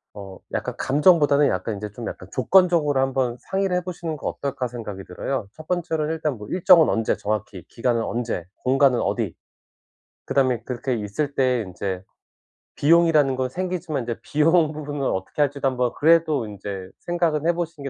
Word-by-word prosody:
어 95 -2 -9
약간 - - -2
감정보다는 145 -1 +4
약간 95 +4 -2
인제 105 +1 -6
좀 115 +3 -7
약간 - - -7
조건적으로 160 -1 +3
한번 130 -2 0
상의를 195 -1 -1
해보시는 175 -3 -4
거 - - -5
어떨까 140 -2 -3
생각이 110 -5 -7
들어요. 105 +5 -4
첫 155 0 -13
번째로는 160 -3 -1
일단 155 -5 -2
뭐 105 -1 -9
일정은 180 -2 +5
언제 115 -1 +1
정확히 105 -3 -4
기간은 120 -1 0
언제 115 -7 -3 0.2
공간은 130 -1 +3
어디 - - -1 0.9
그다음에 130 -4 +1
그렇게 125 +1 -2
있을 115 +8 -3
때 130 -2 +2
인제 95 0 -4 0.7
비용이라는 155 -3 +4
거 130 0 -1
생기지만 175 -3 -3
이제 115 -1 -3
비용 155 +1 +3
부분을 145 -2 -5
어떻게 95 +10 -2
할지도 140 -1 0
한번 125 -2 +1
그래도 155 -5 +3
인제 100 -2 -7
생각은 170 -3 0
해보시는 165 -4 -2
140 Hz, 380 characters per minute, -23 LUFS, 115-160 Hz, 0.9 s, 일정은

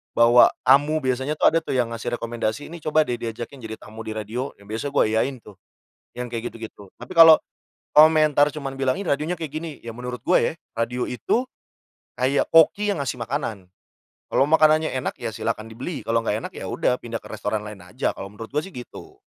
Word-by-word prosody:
bawa 120 +1 +7 0.2
tamu. 145 +3 +4
Biasanya 130 +3 -1
tuh - - +5
ada 165 - +3
tuh 160 - -4
yang 120 -2 +1
ngasih 115 +1 -3
rekomendasi, 115 +2 -3
"Ini 170 - -8
coba 155 0 +3
deh 120 -5 -4
diajakin 115 +4 -6
jadi 110 -2 -7
tamu 110 +1 -10
di 110 - -4
radio." 110 +5 -4
Nah - - -17
biasa 110 +6 -4
gue - - +3
iyain 130 +4 0
tuh 105 - -14 0.6
yang 125 0 -4
kayak 115 0 -5
gitu-gitu. 110 -3 -11
Tapi - - -10
kalo 165 -1 +9 0.6
komentar 155 -1 +6
cuman 140 -3 -6
bilang, 135 +4 0
"Ih 200 - -5
radionya 155 +5 -1
kayak 160 -4 -5
gini." 155 -2 -6
Ya 115 -1 -7
menurut 125 0 -6
gue 180 - +4
ya, - - -10 0.2
radio 120 +2 -2
itu 230 - -1 0.7
kayak 135 +2 +2
koki 200 +6 +5
yang 180 - -3
ngasih 125 - -3
makanan. 115 -6 -4 0.6
Kalau 135 - +3
makanannya 155 0 +4
enak, - - -2
ya - - -2
silahkan 110 +1 -3
dibeli 130 +8 -6
kalau 115 0 +1
nggak 105 - 0
enak - - -6
ya - - -6
udah 125 - 0
pindah 115 -1 -5
ke - - -13
restoran 105 0 -3
lain 105 -1 -8
aja 90 - -2
kalau - - -6
menurut 110 +2 -9
gue 150 +2 0
sih 195 - -12
gitu. 120 -1 -11
125 Hz, 205 wpm, -23 LUFS, 115-150 Hz, 0.7 s, kalo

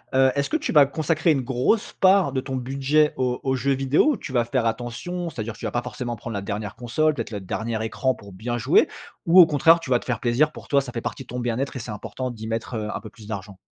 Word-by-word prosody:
heu, 130 0 +5
est-ce 140 0 0
que - - -1
tu 315 - -3
vas 145 -3 +7
consacrer 160 +3 +1
une 135 - 0
grosse 130 - 0
part 190 -5 +5
de 130 - -1
ton 135 0 -5
budget 135 +4 +1
aux 125 -1 0
aux 130 -1 +1
jeux 140 +2 +1
vidéo 135 - +3
ou - - -4
tu 150 - -8
vas 120 -2 +2
faire 120 0 0
attention? 120 +10 -3
C'est-à-dire, 115 -6 -5
tu - - -8
vas 110 - -2
pas 120 - -1
forcément 120 -1 -4
prendre 115 +1 -7
la 100 - -3
dernière 100 0 -4
console, 155 +6 +1
peut-être 115 -5 -5
le 105 -2 -4
dernier 110 +4 -3
écran 130 +3 0
pour 100 -1 -13
bien 120 +6 -4
jouer 130 +7 +4 0.4
ou 175 +3 +7
au 175 - +11
contraire, 160 +2 +5
tu 135 - -8
vas 120 - +4
te - - -14
faire 120 -3 -1
plaisir 125 +6 +2
pour - - -12
toi, 140 -1 +4
ça 130 -2 -8
fait 115 - -3
partie 130 - -5
de - - -26
ton 125 0 -5
bien-être 120 +4 -2
et - - -3
c'est 115 0 -6
important 110 +4 -5
d'y 110 -2 -8
mettre, 115 +2 -3
heu, 110 -1 -3
un - - -4
peu 110 - -9
plus 110 -2 -14
d'argent? 100 -2 -6
125 Hz, 275 wpm, -24 LUFS, 115-140 Hz, 0.4 s, au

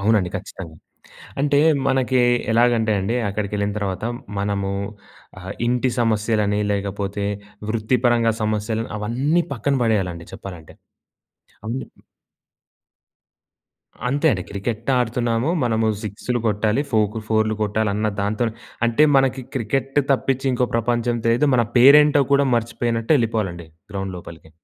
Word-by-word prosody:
అవునండి. 100 -3 +2
ఖచ్చితంగా! 80 -4 -9 0.6
అంటే 145 0 +2 0.3
మనకి 130 -1 +2 0.3
ఎలాగంటే 115 -1 +3
అండి, 105 +6 -1
అక్కడికెళ్ళిన 100 0 -2
తర్వాత 95 0 -3 0.4
మనము 100 -1 -1 0.7
ఆహ్, 95 +2 -6
ఇంటి 125 +1 +1
సమస్యలని, 105 -2 +1
లేకపోతే 100 0 -3 0.4
వృత్తి 115 +3 +1
పరంగా 115 -1 +3
సమస్యలు 110 +1 -1
అవన్నీ 135 +11 0
పక్కన 140 +4 -1
పడేయాలండి 90 -7 -1
చెప్పాలంటే. 90 -6 -10 0.9
అన్నీ. 125 +4 -3 2.2
అంతే 145 +4 0
అండి. 95 -6 -1
క్రికెట్ 110 +4 -4
ఆడుతున్నాము 120 +2 0
మనము 110 -1 +1 0.2
సిక్స్‌లు 110 +4 -3
కొట్టాలి 105 +5 +1
ఫోకు 110 0 +1
ఫోర్‌లు 110 0 +2
కొట్టాలి 105 0 0
అన్న 105 +1 0
దాంతోనే 110 +3 -1 0.3
అంటే 120 +6 +4
మనకి 135 -1 +2
క్రికెట్ 135 +4 -1
తప్పిచ్చి 135 0 0
ఇంకో 125 0 +1
ప్రపంచం 120 +1 0
తెలీదు. 120 +6 +3
మన 120 -2 +3
పేరేంటో 145 +2 +7
కూడా 140 0 +4
మర్చిపోయినట్టు 115 +2 -1
యెళ్ళిపోవాలండి 105 - -2 0.2
గ్రౌండ్ 95 -1 -4
లోపలికి. 80 -2 -12
110 Hz, 115 wpm, -21 LUFS, 100-125 Hz, 2.2 s, పేరేంటో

